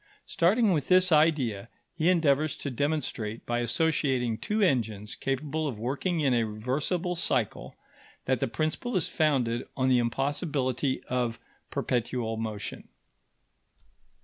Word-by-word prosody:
Starting 200 +4 +3
with 150 -4 -1
this 185 0 +5
idea, 140 -10 +2 0.3
he 160 +3 +2
endeavours 155 -4 +2
to 140 - -4
demonstrate, 125 -5 -2
by 120 0 0
associating 130 -2 +1
two 210 - -2
engines 110 - +1
capable 150 +3 -2
of 125 -6 -4
working 140 - -1
in 135 -3 +3
a 120 -1 +3
reversible 130 - -2
cycle, 125 - -1 0.5
that 130 -2 +1
the - - 0
principle 155 - -1
is 170 - 0
founded 130 -6 +1
on 130 0 +2
the 125 -1 +5
impossibility 135 +1 -1
of 120 -2 -1 0.3
perpetual 120 -2 -1
motion. 110 -2 -5
135 Hz, 125 wpm, -28 LUFS, 120-155 Hz, 0.5 s, this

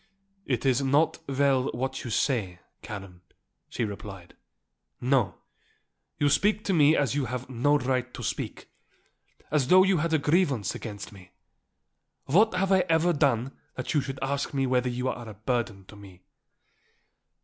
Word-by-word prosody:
"It 125 -1 -1
is 130 0 +3
not 140 +4 +2
well 135 -1 +2
what 130 +2 -3
you 120 - -5
say, 110 -7 0 0.2
Karen," 95 -4 -9 0.5
she 120 - -2
replied. 100 -3 -8 0.6
"No. 120 -8 +1 0.8
You 145 - +2
speak 210 +8 +2
to 195 - +1
me 155 -2 +5
as 140 -3 +1
you 140 -2 0
have 125 +2 -5
no 145 +5 +3
right 130 -1 -1
to - - -7
speak, - - -5 0.8
as 145 -4 +2
though 185 +4 +7
you 190 -1 +3
had 165 +1 -1
a 160 - +4
grievance 145 - +1
against 105 -3 -7
me. 90 -3 -15 0.9
What 200 +8 +4
have 190 +1 +1
I 190 - +5
ever 165 +2 +3
done 135 -4 +1 0.2
that 130 - -4
you 150 - +3
should 135 0 -6
ask 140 +1 -2
me 135 -1 +1
whether 125 -1 +1
you 125 +1 -2
are 120 -3 -4
a 105 - -10
burden 110 -3 -2
to 105 - -14
me?" 95 -3 -14
130 Hz, 160 wpm, -27 LUFS, 115-145 Hz, 0.9 s, though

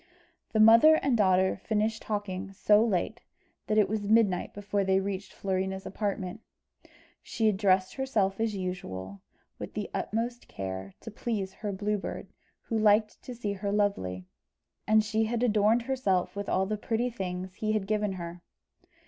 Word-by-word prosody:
The 220 - +1
mother 230 +8 +8
and 275 -5 +1
daughter 190 -2 +3
finished 220 0 0
talking 200 -2 -4
so 210 +2 +4
late 220 +2 -1 0.5
that 215 - +1
it 210 - +5
was 205 -1 -3
midnight 215 -5 +3
before 205 0 -2
they 190 0 +3
reached 195 0 -4
Florina's 190 0 -2
apartment. 200 0 -3 0.8
She 225 - -2
had 215 -2 +4
dressed 190 -1 +2
herself 215 -8 0
as 225 -2 0
usual, 100 - -5 0.4
with - - -7
the - - -4
utmost 235 +2 -3
care, 95 0 -6
to 225 - -8
please 205 -3 -3
her 210 0 -4
Blue 205 +2 -1
Bird, - - -6 0.3
who 225 -2 -1
liked 215 0 +3
to 250 - -8
see 210 -4 -3
her 200 +1 -3
lovely; 95 - -1 0.6
and 215 0 +5
she 220 +1 0
had 235 +2 -1
adorned 220 0 +3
herself 205 -9 0
with 200 0 -4
all 190 - +2
the 215 +2 -2
pretty 235 +3 -1
things 185 -3 -5
he 215 +2 -1
had 215 -3 0
given 210 -1 0
her. 175 -1 -7
205 Hz, 165 wpm, -29 LUFS, 190-220 Hz, 0.8 s, mother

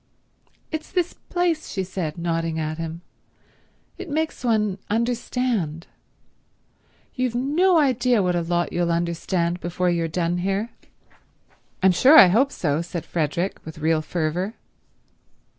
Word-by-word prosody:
"It's 315 -1 -5
this 360 -2 0
place," 350 -3 -2
she 190 - -2
said, 180 -4 -4
nodding 165 -1 -1
at 155 0 -3
him. 165 +1 -5 1.0
"It 380 -3 -7
makes 315 -1 -2
one 210 -5 +1
understand. 230 -7 -1 1.3
You've 255 -2 -1
no 320 +9 +3
idea 250 -6 +3
what 180 -1 +1
a 175 - +1
lot 175 +1 -1
you'll 175 -1 +1
understand 170 +1 -1
before 175 +1 -1
you've 165 -2 -1
done 175 +1 0
here." 195 +5 -1 1.1
"I'm 190 - +6
sure 270 - +6
I 190 - +10
hope 260 +9 +3
so," 150 -1 -1
said 170 -1 -6
Frederick 170 +3 -2
with 160 +1 -9
real 160 0 +1
fervour. 175 +6 -2
180 Hz, 130 wpm, -23 LUFS, 170-250 Hz, 1.3 s, I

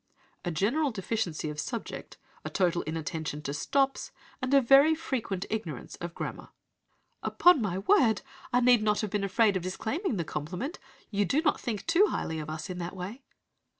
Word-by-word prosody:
"'A - - 0
general 235 - +1
deficiency 190 -7 -2
of 150 - -7
subject, 230 +9 -5 0.3
a - - -4
total 175 -2 +1
inattention 160 -1 -3
to 140 -1 -4
stops, 270 - 0 0.3
and 255 0 -2
a 280 - +7
very 275 +5 +6
frequent 235 - -3
ignorance 175 - -4
of 170 0 -6
grammar.' - - -5 0.7
"'Upon 355 -6 +5
my 190 -4 -1
word, 220 - +3 0.3
I 245 - +3
need 245 -2 +6
not 210 -1 +2
have 210 -3 -3
been 205 -1 0
afraid 205 +1 +3
of 185 - 0
disclaiming 220 - -2
the 170 - 0
compliment! 180 - -4 0.3
You 205 -1 +2
do 285 - +1
not 300 - +2
think 220 -5 -3
too 350 +5 +5
highly 160 - -2
of 155 0 -6
us 155 0 -5
in 180 -1 -5
that 175 +2 -5
way.' 195 +8 -6
210 Hz, 180 wpm, -29 LUFS, 175-260 Hz, 0.7 s, a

